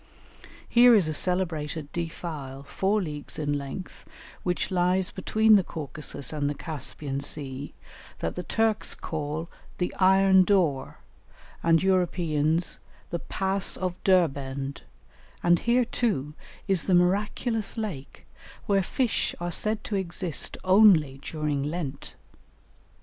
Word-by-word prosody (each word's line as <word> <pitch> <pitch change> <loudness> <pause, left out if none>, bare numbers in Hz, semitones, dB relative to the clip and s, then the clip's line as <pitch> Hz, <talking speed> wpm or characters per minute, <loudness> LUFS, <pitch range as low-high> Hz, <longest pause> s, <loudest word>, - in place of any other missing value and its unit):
Here 240 0 +7
is 190 -7 +4
a 155 - -1
celebrated 160 -4 -1
defile, 155 -5 -5
four 195 +8 0
leagues 150 -3 -6
in 145 -1 -1
length, 140 +6 -7 0.4
which 180 +2 -2
lies 180 0 +1
between 215 +3 +4
the 195 - +2
Caucasus 150 -2 -3
and 145 -2 -1
the 145 - -3
Caspian 140 -2 -5
Sea, 140 -1 -5 0.4
that 85 - -3
the - - -4
Turks 220 +3 0
call 155 0 -4 0.3
the 180 - -2
Iron 190 0 +6
Door, 175 -8 +1 0.6
and 165 +1 +3
Europeans 170 -3 +1 0.3
the 170 - -2
Pass 195 +2 0
of 185 -1 -2
Derbend, 140 -7 +1 0.6
and 175 -1 +4
here 240 +1 +2
too 195 - -1 0.3
is 190 -4 +2
the 185 - +3
miraculous 205 +5 0
lake, 185 -12 -6 0.4
where 195 -1 +3
fish 240 +5 -1
are 175 0 -3
said 215 +5 0
to 210 - -3
exist 180 -3 -2
only 185 -8 +5
during 150 -1 -2
Lent. 145 -2 -5
175 Hz, 120 wpm, -26 LUFS, 150-195 Hz, 0.6 s, Here